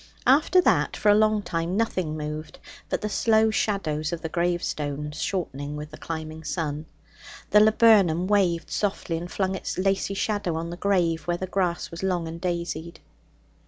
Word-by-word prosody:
After 300 Hz, +7 st, +5 dB
that, -, -, +2 dB
for 210 Hz, -, +2 dB
a -, -, +8 dB
long 215 Hz, 0 st, +3 dB
time, 170 Hz, +1 st, -2 dB
nothing 185 Hz, -8 st, -1 dB
moved 150 Hz, 0 st, -6 dB, 0.3 s
but -, -, -1 dB
the 210 Hz, -, -1 dB
slow 220 Hz, +1 st, +3 dB
shadows 155 Hz, -8 st, -1 dB
of 170 Hz, -1 st, -5 dB
the 160 Hz, -, -3 dB
gravestones, 150 Hz, -3 st, -2 dB
shortening 150 Hz, -6 st, -3 dB
with 150 Hz, +1 st, -7 dB
the 155 Hz, -, -10 dB
climbing 160 Hz, -1 st, -6 dB
sun. 155 Hz, -1 st, -3 dB, 0.6 s
The 210 Hz, -, +7 dB
laburnum 210 Hz, -6 st, +5 dB
waved 185 Hz, -4 st, +1 dB
softly, 200 Hz, -4 st, -1 dB
and 175 Hz, +1 st, -7 dB
flung 190 Hz, -1 st, -1 dB
its 190 Hz, -, -4 dB
lacy 195 Hz, +1 st, 0 dB
shadow 205 Hz, -4 st, -1 dB
on 165 Hz, +1 st, -4 dB
the -, -, -5 dB
grave 175 Hz, -5 st, 0 dB
where 175 Hz, 0 st, 0 dB
the 185 Hz, -, -3 dB
grass 185 Hz, -2 st, -1 dB
was 170 Hz, -, -7 dB
long 180 Hz, -3 st, -1 dB
and 165 Hz, +1 st, -7 dB
daisied. 170 Hz, -2 st, -3 dB
175 Hz, 170 wpm, -25 LUFS, 160-200 Hz, 0.6 s, a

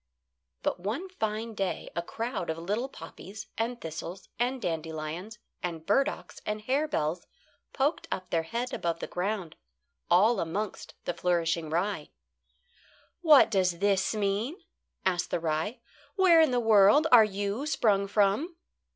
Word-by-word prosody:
But -, -, 0 dB
one 230 Hz, -, -3 dB
fine 220 Hz, -8 st, -3 dB
day 195 Hz, -5 st, -3 dB
a 170 Hz, -, 0 dB
crowd 225 Hz, -1 st, -4 dB
of 160 Hz, -, -1 dB
little 210 Hz, +10 st, -2 dB
poppies, 200 Hz, -5 st, -10 dB
and 235 Hz, +2 st, -2 dB
thistles 165 Hz, +2 st, -7 dB
and 250 Hz, +2 st, 0 dB
dandelions, 165 Hz, +3 st, -4 dB, 0.2 s
and 165 Hz, -3 st, -4 dB
burdocks 275 Hz, -, 0 dB
and 210 Hz, 0 st, -3 dB
harebells 215 Hz, -, -1 dB, 0.4 s
poked 290 Hz, +4 st, 0 dB
up 185 Hz, -, -4 dB
their 165 Hz, -, +2 dB
heads 235 Hz, +9 st, -4 dB
above 170 Hz, -1 st, -2 dB
ground, 185 Hz, -2 st, -3 dB, 0.5 s
all 205 Hz, +6 st, +5 dB
amongst 195 Hz, +5 st, -4 dB
the 175 Hz, -, -1 dB
flourishing 170 Hz, -2 st, 0 dB
rye. 180 Hz, +6 st, -1 dB, 1.1 s
"What 305 Hz, -8 st, +7 dB
does 185 Hz, -4 st, +2 dB
this 195 Hz, +2 st, +1 dB
mean?" 210 Hz, -, -1 dB, 0.4 s
asked 180 Hz, -2 st, +1 dB
the -, -, 0 dB
rye. 165 Hz, +9 st, -2 dB, 0.3 s
"Where 365 Hz, -4 st, +6 dB
in 315 Hz, -, +5 dB
the 250 Hz, -1 st, +1 dB
world 220 Hz, +5 st, +6 dB
are 235 Hz, -3 st, +9 dB
you 205 Hz, +6 st, -2 dB
sprung 205 Hz, -9 st, +2 dB
from?" 210 Hz, -, +1 dB
205 Hz, 135 wpm, -29 LUFS, 175-240 Hz, 1.1 s, are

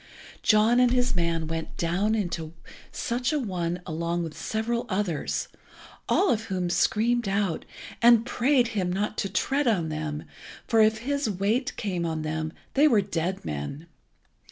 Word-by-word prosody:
John 220 Hz, +3 st, +4 dB
and 250 Hz, -1 st, +5 dB
his 250 Hz, -2 st, +1 dB
man 170 Hz, -2 st, 0 dB
went 160 Hz, 0 st, -5 dB
down 190 Hz, +6 st, +1 dB
into 170 Hz, -6 st, -3 dB, 0.4 s
such 250 Hz, +3 st, -1 dB
a 305 Hz, -, +1 dB
one 180 Hz, -8 st, -2 dB
along 170 Hz, +1 st, -2 dB
with 160 Hz, -2 st, -6 dB
several 235 Hz, +2 st, -2 dB
others, 185 Hz, -5 st, -1 dB, 0.6 s
all 395 Hz, -, +4 dB
of 220 Hz, -1 st, 0 dB
whom 185 Hz, -4 st, -2 dB
screamed 235 Hz, +4 st, +2 dB
out, 195 Hz, -4 st, 0 dB, 0.4 s
and 235 Hz, -1 st, +6 dB
prayed 250 Hz, 0 st, +2 dB
him 190 Hz, -6 st, -1 dB
not 205 Hz, +3 st, -1 dB
to 195 Hz, -, -1 dB
tread 275 Hz, +8 st, 0 dB
on 180 Hz, -8 st, +1 dB
them, 155 Hz, -1 st, -4 dB, 0.4 s
for 225 Hz, -2 st, +4 dB
if 215 Hz, 0 st, +4 dB
his 280 Hz, -3 st, 0 dB
weight 215 Hz, +8 st, 0 dB
came 185 Hz, -5 st, -2 dB
on 160 Hz, -2 st, -2 dB
them 155 Hz, 0 st, -2 dB, 0.2 s
they 290 Hz, +3 st, +5 dB
were 225 Hz, -8 st, +4 dB
dead 185 Hz, -1 st, -3 dB
men. 75 Hz, -, -5 dB
200 Hz, 155 wpm, -26 LUFS, 170-235 Hz, 0.6 s, and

